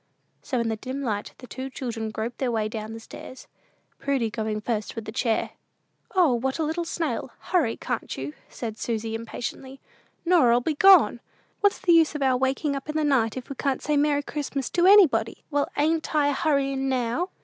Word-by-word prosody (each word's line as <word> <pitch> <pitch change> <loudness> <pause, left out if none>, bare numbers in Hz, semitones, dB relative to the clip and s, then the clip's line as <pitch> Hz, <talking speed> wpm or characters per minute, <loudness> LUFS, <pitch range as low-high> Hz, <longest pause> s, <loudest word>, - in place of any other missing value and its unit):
So 255 - -2
in 230 -1 0
the 220 - -2
dim 260 +5 -5
light 210 -4 -3
the - - -11
two 260 +2 -6
children 230 -4 -4
groped 220 +2 -5
their 255 -3 0
way 220 -2 0
down 220 0 -6
stairs, 240 +3 -11 0.5
Prudy 270 -5 0
going 215 -1 -2
first 215 -1 -3
with 225 -2 -5
the 220 - -6
chair. 230 -1 0 0.6
"O, 345 -8 +5
what 260 +3 -1
a 325 - 0
little 320 +3 -2
snail! 330 0 -2
Hurry 315 -11 0
can't 245 -2 -4
you?" 135 +3 -5 0.2
said 225 -3 -6
Susy, 225 -1 -2
impatiently; 245 +4 -6 0.5
"Norah'll 255 -10 +5
be 305 +6 -1
gone! 310 - +6 0.4
What's 405 -1 +3
the 345 - +3
use 325 -2 +4
of 290 - -1
our 260 -1 +3
waking 265 +3 0
up 275 +2 -6
in 305 - -3
the 310 - +1
night 260 -6 +2
if 255 - -6
we 275 - -6
can't 275 0 -1
say 300 - +1
Merry 290 0 +2
Christmas 280 -3 -4
to 355 +1 +3
anybody?" 295 - +5
"Well, 285 -1 +1
ain't 315 +2 0
I 290 -1 +4
a - - +1
hurryin' 275 -2 0
now?" 255 +7 -1
265 Hz, 195 wpm, -25 LUFS, 230-300 Hz, 0.6 s, gone